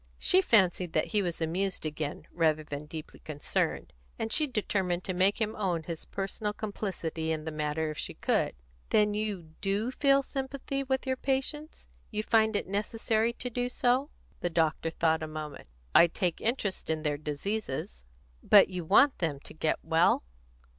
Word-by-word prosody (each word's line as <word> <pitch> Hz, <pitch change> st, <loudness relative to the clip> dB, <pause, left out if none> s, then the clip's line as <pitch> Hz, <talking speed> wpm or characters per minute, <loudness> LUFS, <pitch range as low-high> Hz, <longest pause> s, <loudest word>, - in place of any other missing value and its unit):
She 375 Hz, -, +4 dB
fancied 185 Hz, -, +3 dB
that 155 Hz, -, +1 dB
he 210 Hz, -, +4 dB
was 175 Hz, -3 st, -3 dB
amused 180 Hz, +3 st, -1 dB
again, 150 Hz, -1 st, -4 dB
rather 155 Hz, -2 st, +2 dB
than 145 Hz, 0 st, -6 dB
deeply 155 Hz, 0 st, -8 dB
concerned, 150 Hz, -2 st, -2 dB, 0.2 s
and 225 Hz, -, -3 dB
she 305 Hz, -1 st, +3 dB
determined 190 Hz, -7 st, -1 dB
to 185 Hz, -, -2 dB
make 190 Hz, +4 st, +2 dB
him 220 Hz, -1 st, -1 dB
own 180 Hz, -6 st, -1 dB
his 165 Hz, 0 st, -6 dB
personal 200 Hz, +2 st, -3 dB
complicity 180 Hz, -7 st, -3 dB
in 155 Hz, -1 st, -3 dB
the 160 Hz, -, -3 dB
matter 155 Hz, +1 st, -1 dB
if 155 Hz, -, -7 dB
she -, -, -4 dB
could. -, -, 0 dB, 0.3 s
"Then 210 Hz, -1 st, +3 dB
you 205 Hz, -6 st, -3 dB
do 205 Hz, +5 st, 0 dB
feel 275 Hz, 0 st, +3 dB
sympathy 275 Hz, 0 st, -3 dB
with 265 Hz, 0 st, -1 dB
your 260 Hz, -1 st, 0 dB
patients? 275 Hz, +4 st, -2 dB, 0.2 s
You 215 Hz, -1 st, -2 dB
find 220 Hz, -1 st, +3 dB
it -, -, 0 dB
necessary 220 Hz, +3 st, 0 dB
to 250 Hz, +1 st, -5 dB
do 245 Hz, +1 st, -1 dB
so?" 255 Hz, +3 st, +1 dB, 0.3 s
The 175 Hz, -, -1 dB
doctor 165 Hz, -1 st, +1 dB
thought 160 Hz, 0 st, +1 dB
a 155 Hz, -, -3 dB
moment. 155 Hz, -, -7 dB, 0.3 s
"I 170 Hz, -, +8 dB
take 175 Hz, 0 st, -2 dB
an -, -, +1 dB
interest 215 Hz, -8 st, -1 dB
in 160 Hz, -1 st, -1 dB
their 150 Hz, -2 st, 0 dB
diseases." 150 Hz, -, -3 dB, 0.4 s
"But 200 Hz, -2 st, +7 dB
you 180 Hz, -2 st, -4 dB
want 250 Hz, -, +5 dB
them 155 Hz, -5 st, -1 dB
to -, -, -9 dB
get 155 Hz, 0 st, 0 dB
well?" 165 Hz, -, +3 dB
190 Hz, 175 wpm, -29 LUFS, 160-225 Hz, 0.4 s, I